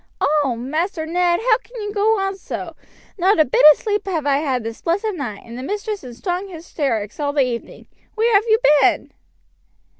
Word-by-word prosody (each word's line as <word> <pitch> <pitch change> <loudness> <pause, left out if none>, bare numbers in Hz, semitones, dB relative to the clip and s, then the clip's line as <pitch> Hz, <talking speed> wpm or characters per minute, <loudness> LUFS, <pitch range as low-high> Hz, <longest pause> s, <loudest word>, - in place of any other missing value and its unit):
"Oh! 285 -4 +1
Master 315 - -3
Ned, 345 +2 +1
how 460 -1 +3
can - - -12
you 415 0 -5
go 430 +2 +2
on 390 0 -1
so? 380 - -7 0.4
Not 375 +1 +3
a 310 - +6
bit 255 - +1
of - - +1
sleep 415 -2 -2
have 325 -6 -2
I 280 -1 +2
had 265 -5 -1
this 225 0 -7
blessed 405 +6 -1
night, 245 - -6
and 235 +1 -9
the - - -5
mistress 410 +5 -4
in 245 -2 -9
strong 360 - -3
hystrikes 280 - -3
all 285 -1 -1
the 280 -3 +3
evening. 235 -2 -6 0.3
Where 450 +1 +2
have 405 +2 +4
you 440 0 +5 0.2
been?" - - +2
335 Hz, 200 wpm, -20 LUFS, 275-405 Hz, 0.4 s, a